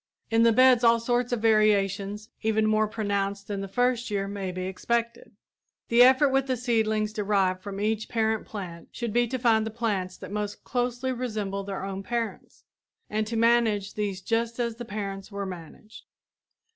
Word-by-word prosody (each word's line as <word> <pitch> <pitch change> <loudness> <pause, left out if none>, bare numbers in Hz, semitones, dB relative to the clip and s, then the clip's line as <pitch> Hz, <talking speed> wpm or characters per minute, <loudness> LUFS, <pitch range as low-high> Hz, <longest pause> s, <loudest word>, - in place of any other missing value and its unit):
In 225 0 +4
the 230 0 +6
beds 255 +1 +5
all 230 0 +5
sorts 245 +1 0
of 235 -2 -1
variations 210 -1 +2
even 220 -1 +1
more 215 0 +2
pronounced 200 -2 -2
than 200 -1 -3
the 195 - -4
first 245 +4 0
year 200 -1 -1
may 195 -2 -4
be 185 0 -5
expected. 235 +5 -2 0.5
The 235 +1 +5
effort 265 +3 +6
with 270 0 +1
the 255 -1 0
seedlings 220 -3 0
derived 195 -3 +1
from 195 0 -6
each 215 +1 -1
parent 220 -2 0
plant 175 -5 -8
should 235 -4 -4
be 240 0 +3
to 260 - -2
find 230 -3 +3
the 220 - -3
plants 205 -5 -2
that - - -9
most 210 0 -4
closely 245 +1 -1
resemble 215 -6 -3
their 195 -1 -5
own 195 0 -4
parents, 230 +2 -4 0.5
and 215 0 0
to 230 +1 -3
manage 225 -4 +2
these 200 -3 -3
just 230 +3 -1
as 235 -2 -1
the 240 - -6
parents 200 -2 -5
were 200 0 -4
managed. 185 +4 -10
215 Hz, 180 wpm, -27 LUFS, 200-235 Hz, 0.5 s, the